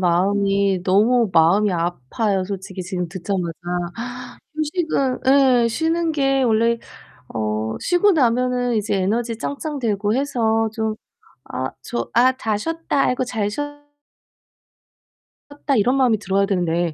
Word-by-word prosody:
마음이 195 +1 +2
너무 220 +4 +3
마음이 175 +6 +4
아파요, 175 - -1
솔직히 190 -1 -6
지금 180 -1 -4
듣자마자. 180 -2 -3 1.0
휴식은 310 -4 -1 0.4
예 - - +2
쉬는 325 +6 0
게 270 -2 +1
원래 230 0 +2 0.6
어 110 0 -2
쉬고 355 +4 +3
나면은 250 -4 +1
이제 210 -1 0
에너지 225 +4 -1
짱짱되고 230 -8 -2
해서 225 -5 +1
좀 220 -1 -2 0.6
'아 130 +1 -2
저 120 -1 -4
아 250 +3 +5
다 215 -2 -1
쉬었다. 325 +3 -1
아이고 255 0 0
잘 220 -4 -2
쉬어' 290 +8 -3 1.9
"었다." 285 -1 -2
이런 245 +4 +3
마음이 250 -5 +3
들어야 195 0 +1
되는데 175 -3 0
220 Hz, 260 characters per minute, -21 LUFS, 190-255 Hz, 1.9 s, 아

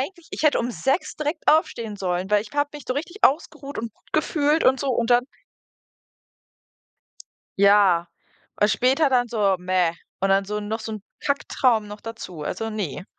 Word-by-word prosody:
eigentlich 345 +4 -6
ich - - -5
hätte 305 -2 +4
um 240 +1 -2
6 270 +7 -1
direkt 305 +1 -3
aufstehen 230 -8 +1
sollen, 185 0 -2
weil 210 -1 +4
ich 215 - -13
habe 290 0 +1
mich 295 -3 -9
so 255 - -1
richtig 335 +8 -5
ausgeruht 285 -1 +1
und 225 -1 -4
gut - - -31
gefühlt 300 0 +1
und 265 +1 +4
so 280 - -1
und 235 -1 0
dann 245 +1 +4 2.3
Ja, 200 -4 +5 0.5
und 210 - +5
später 265 +6 +3
dann 245 -2 +2
so: 205 -4 +1
„Mäh.“ 180 -2 +1 0.3
Und 195 - +1
dann 195 0 +3
so 210 +1 -3
noch 215 +2 -4
so 220 0 -6
'n 215 - -7 0.2
Kacktraum 250 -6 +1
noch 210 0 -10
dazu, 205 -8 -8
also, 225 +9 -3
ne. 195 -6 -4
225 Hz, 180 wpm, -23 LUFS, 200-280 Hz, 2.3 s, Ja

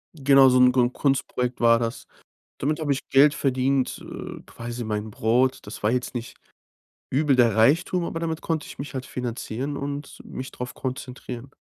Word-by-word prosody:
Genau 135 -2 +6
so 125 0 +4
'n 125 0 +7
g 130 - -4
so - - +6
'n 120 +1 0
Kunstprojekt 130 -3 0
war 115 -1 +5
das. 115 0 -4 0.5
Damit 150 +3 -1
habe 150 -3 -1
ich 135 - -2
Geld 145 +2 +6
verdient, 130 0 0
äh, - - -8
quasi 120 +1 -6
mein 105 -1 -3
Brot. 120 +5 +2
Das 105 - -8
war 105 - +3
jetzt 125 0 -2
nicht 120 -1 -5 0.8
übel 140 0 +2
der 120 -2 +4
Reichtum, 160 +10 +3
aber 165 - -3
damit 165 -1 -3
konnte 160 -2 -2
ich - - -11
mich 140 +1 -6
halt 130 -2 -5
finanzieren 125 +3 -4
und 140 +1 -5
mich 130 0 -7
drauf 125 0 -7
konzentrieren. 130 -1 -6
130 Hz, 185 wpm, -25 LUFS, 120-140 Hz, 0.8 s, n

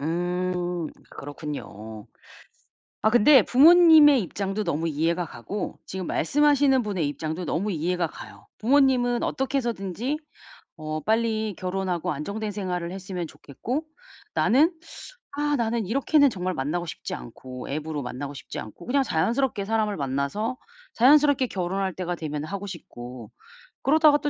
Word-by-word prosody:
음. 175 +1 -2 0.2
그렇군요. 110 -7 -8 1.0
아 215 - +4
근데 245 +4 +7
부모님의 310 - +7
입장도 195 +2 -3
너무 160 +3 -1
이해가 165 +3 0
가고 155 - -6
지금 185 -1 -5
말씀하시는 285 - +3
분의 190 -8 -1
입장도 160 +4 -4
너무 200 +6 -1
이해가 175 +1 0
가요. - - -12
부모님은 250 -1 +3
어떻게 270 +1 -1
해서든지 235 - -2 0.6
어 155 -1 -4
빨리 220 0 0
결혼하고 185 -2 -2
안정된 200 +9 -4
생활을 180 -4 -3
했으면 185 -2 -5
좋겠고 245 - -5 0.5
나는 300 +10 +4 0.6
'아 295 +1 0
나는 230 -2 0
이렇게는 275 - +3
정말 185 -3 -3
만나고 155 +6 -2
싶지 - - -6
않고 125 - -9
앱으로 150 0 -3
만나고 135 +3 -6
싶지 - - -8
않고 110 - -11
그냥 275 +3 +2
자연스럽게 235 +2 0
사람을 215 -1 0
만나서 140 - -2 0.4
자연스럽게 280 +1 +5
결혼할 190 0 -2
때가 175 0 -3
되면 150 -2 -4
하고 200 +5 -5
싶고 125 - -9 0.5
그러다가 305 +1 +5
또 295 0 -1
190 Hz, 330 characters per minute, -25 LUFS, 160-245 Hz, 1.0 s, 근데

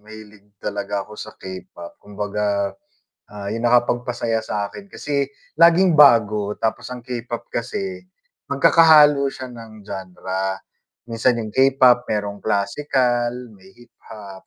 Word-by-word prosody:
mahilig 105 -1 -15
talaga 100 0 -4
ako 105 - -15
sa 110 0 -9
K-pop. 95 -2 -10
Kumbaga, 105 -1 -2 0.5
ah, 100 -1 -7
yung 115 +2 -2
nakapagpasaya 120 -1 +1
sa'kin 110 - -5
kasi 145 -7 -2 0.3
laging 170 0 +5
bago 105 -7 +5
tapos 110 - -3
ang 125 -1 -8
K-pop 120 -1 -6
kasi 95 -6 -5 0.4
magkakahalo 150 -1 +5
siya 130 -2 -6
ng 115 -3 -12
genre. 95 0 -5 0.5
Minsan 115 +1 +1
yung 110 - -6
K-pop 130 0 +4
mayrong 105 -1 -3
classical, 120 +3 -1
may 95 0 -19
hip-hop, 105 -5 -13
110 Hz, 115 wpm, -21 LUFS, 100-125 Hz, 0.5 s, laging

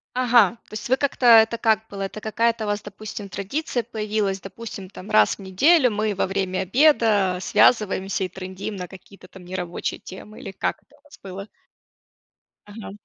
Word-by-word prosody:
Ага. 240 -4 +4
То - - -17
есть 215 - -6
вы 260 - +3
как-то 275 -2 -1
это 230 -1 +7
как 220 -1 +1
было? 200 -1 -7
Это 195 +2 -5
какая-то 225 +1 0
у - - -5
вас, 205 0 -1
допустим, 205 0 -8
традиция 240 - -3
появилась? 210 -3 -2
Допустим, 195 -2 -9
там: 200 -1 -11
"Раз 105 -1 +4
в - - -31
неделю 250 - +3
мы 215 0 -1
во - - 0
время 190 -1 -2
обеда 210 - +3
связываемся 195 -2 +2
и - - -3
трындим 190 +3 -7
на 180 -2 -6
какие-то 190 0 -15
там 185 -2 -14
нерабочие 180 -1 -4
темы". 210 +3 -11
Или 195 - -7
как - - -3
это 290 - -26
у 285 - -31
вас 290 - -17
было? 195 +1 -8 1.2
Ага. 205 0 -9
205 Hz, 180 wpm, -23 LUFS, 190-230 Hz, 1.2 s, это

